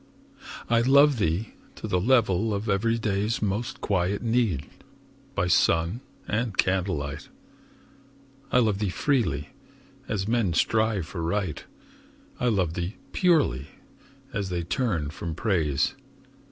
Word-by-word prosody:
I 115 -1 +3
love 140 +1 +5
thee 90 +4 -1 0.2
to - - -6
the 90 - +1
level 110 -3 +3
of 100 +3 -4
everyday's 105 0 0
Most 110 +5 -2
quiet 95 +1 0
need, 115 - +1 0.7
by - - +1
sun 85 +4 +2 0.3
and 110 -2 -1
candlelight. 85 -6 -1 1.2
I - - +4
love 110 -5 +3
thee 105 -2 0
freely, 100 - 0 0.6
as 100 -2 -2
men 115 -6 +1
strive 110 -1 +1
for 85 +1 -6
Right; 85 0 -2 0.8
I 125 - +1
love 95 -8 +1
thee 90 +4 -3 0.2
purely, 150 - +2 0.7
as 100 -3 -2
they 90 -1 -2
turn 85 - -1
from 80 0 -5
Praise. 80 - +1
100 Hz, 120 wpm, -26 LUFS, 85-115 Hz, 1.2 s, love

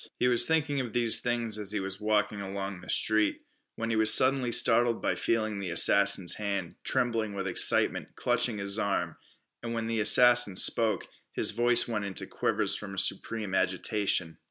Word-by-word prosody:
He 125 - +1
was 120 -1 +3
thinking 150 -3 0
of 120 -5 -5
these 120 -2 +2
things 120 -3 -2
as 105 -1 -2
he 105 - -2 0.2
walked 105 0 +1
along 100 -2 -6
the - - -13
street, 110 -1 0 0.3
when 115 0 -3
he - - 0
was 110 0 +2
suddenly 130 -2 +2
startled 120 0 +2
by - - -1
feeling 110 -3 -2
the 95 -2 -5
assassin's 100 +2 +3
hand, 100 -4 -4
trembling 115 -4 -1
with 95 -1 -4
excitement, 95 - 0
clutching 115 -4 -1
his 100 +1 -2
arm, 100 -2 -2 0.4
and 115 0 -5
when 115 -1 -3
the 115 0 -2
assassin 120 -1 +5
spoke, 110 +3 +2 0.3
his - - -1
voice 120 +2 +1
went 105 -4 -3
into 95 -1 -3
quavers - - -1
from 100 -2 -7
a - - -13
supreme 105 0 -2
agitation. 95 -2 -1
110 Hz, 175 wpm, -28 LUFS, 100-120 Hz, 0.4 s, assassin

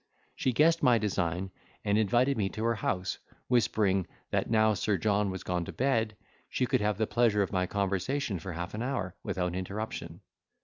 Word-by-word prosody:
She 130 - +1
guessed 160 +6 +4
my 125 -4 +5
design, 95 -3 -1 0.3
and 100 - +2
invited 120 +6 +3
me 100 -4 0
to 110 - -5
her 115 0 +3
house, 95 -3 -2 0.3
whispering, 100 -6 +2 0.2
that - - 0
now 110 -1 +4
Sir 105 0 0
John 100 +3 +1
was 95 -1 -5
gone 90 -1 -1
to - - -6
bed, 115 -5 +1 0.3
she 130 - 0
could 115 - +1
have 105 -1 +1
the 110 - +2
pleasure 110 -3 +3
of 95 - -4
my 90 -2 +1
conversation 100 +3 -1
for 90 +2 -6
half 85 +2 -5
an 105 - -4
hour 120 -8 -2
without 90 -2 -2
interruption. 100 +4 -5
105 Hz, 185 wpm, -30 LUFS, 95-115 Hz, 0.3 s, my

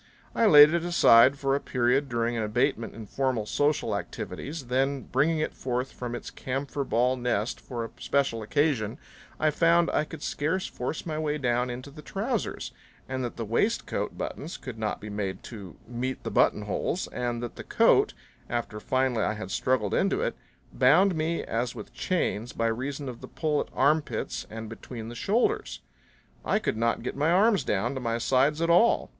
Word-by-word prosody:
I 230 - +3
laid 150 -3 +9
it 170 -1 +1
aside 140 -6 +6
for 135 -1 0
a 140 - +2
period 130 +2 +1
during 120 0 0
an 115 - -1
abatement 110 +1 0
in 110 -1 -8
formal 130 -1 -1
social 145 -3 +1
activities; 145 +7 -5
then 135 +2 0
bringing 150 +5 +1
it 155 - -1
forth 125 +1 -3
from 120 -1 -5
its - - -7
camphor 140 +2 -3
ball 125 0 +2
nest 120 -3 -1
for 120 -3 -5
a - - -10
special 140 -5 0
occasion 120 -2 0 0.4
I 155 0 +3
found 170 +2 +3
I 150 - +1
could 155 -1 -9
scarce 165 +6 -1
force 125 +5 -4
my 155 -2 -3
way 150 -1 -1
down 125 -2 0
into 125 +3 -7
the 150 +2 -11
trousers, - - -3 0.4
and 130 0 -3
that 120 - -4
the 115 - -4
waistcoat 160 - -1
buttons 170 - -5
could 120 -4 -8
not 110 -1 -2
be 105 - -7
made 100 -2 -3
to 100 -7 -9
meet 125 +2 -4
the - - -4
buttonholes, 105 - +1
and 120 -1 -3
that 120 - -5
the - - -8
coat, - - +3 0.3
after 120 -3 -3
finally 130 0 0
I - - 0
had 95 -3 -7
struggled 125 -6 0
into - - +1
it, - - -1 0.4
bound 180 +10 +5
me 160 +1 -1
as 120 +2 -2
with 110 0 -9
chains 120 - -1
by 115 - -1
reason 135 +5 -2
of 125 -2 -7
the - - -8
pull 155 -2 0
at - - -5
armpits 140 -4 0
and 110 0 -7
between 115 0 -8
the - - -7
shoulders. 215 - 0 0.6
I - - +2
could 215 - -1
not 115 +1 0
get 125 - -4
my 145 +3 +1
arms 195 - +4
down 115 +3 0
to 130 - -4
my 115 -1 -1
sides 135 +6 +2
at 165 - +1
all. 200 +8 +4
130 Hz, 185 wpm, -27 LUFS, 115-150 Hz, 0.6 s, laid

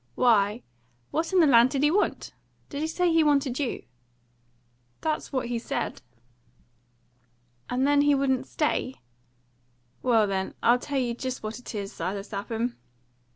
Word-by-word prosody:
"Why, 220 -1 +3 0.5
what 325 +3 -1
in 375 -2 +5
the - - +6
land 245 -3 +6
did 275 +1 -1
he 295 - +4
want? 415 +4 0 0.4
Did 285 - -5
he 315 - 0
say 345 +1 +1
he 325 -1 +5
wanted 280 -3 +2
you?" 275 -5 -2 1.2
"That's 310 -1 -2
what 260 -3 -1
he 235 0 -2
said." 230 - -4 1.7
"And 255 +2 +1
then 285 0 +4
he 290 0 +4
wouldn't 265 -1 0
stay?" 280 -4 -1 1.1
"Well, 230 -4 +3
then, 190 -1 -2
I'll 240 +1 +5
tell 285 +2 -3
you 245 -3 0
just 255 0 -5
what 215 +3 -5
it 245 - -9
is, 200 -1 -4
Silas 195 +4 -4
Lapham. 225 +4 -3
255 Hz, 155 wpm, -26 LUFS, 230-290 Hz, 1.7 s, the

